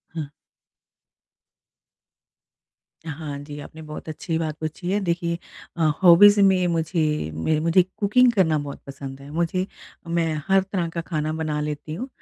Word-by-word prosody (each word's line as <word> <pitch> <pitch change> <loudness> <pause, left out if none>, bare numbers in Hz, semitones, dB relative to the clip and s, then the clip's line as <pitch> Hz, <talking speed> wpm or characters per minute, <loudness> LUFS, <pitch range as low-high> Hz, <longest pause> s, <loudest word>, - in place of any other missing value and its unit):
हुँ। 155 -3 -4 2.8
हाँ 145 -2 -5
जी, 145 +1 -8
आपने 160 +2 -11
बहुत 155 +1 -8
अच्छी 160 +1 -3
बात 155 -2 -2
पूछी 160 +3 -4
है। 205 - +2
देखिए 170 -2 -1 0.4
अ, 165 - -2 0.2
हॉबीज़ 205 +4 +8
में 190 -2 +4
मुझे 160 - 0
मेरे 150 - 0
मुझे 165 +3 +4
कुकिंग 240 +4 +4
करना 175 -8 +2
बहुत 145 -1 -7
पसंद 135 -1 -8
है। 140 - -11
मुझे 170 +3 0 0.4
मैं 165 -1 0
हर 195 0 +5
तरह 190 -3 -2
का 170 - -2
खाना 155 -2 -2
बना 155 -2 -2
लेती 150 +1 -4
हूँ 245 +10 -5
160 Hz, 145 wpm, -23 LUFS, 150-180 Hz, 2.8 s, हॉबीज़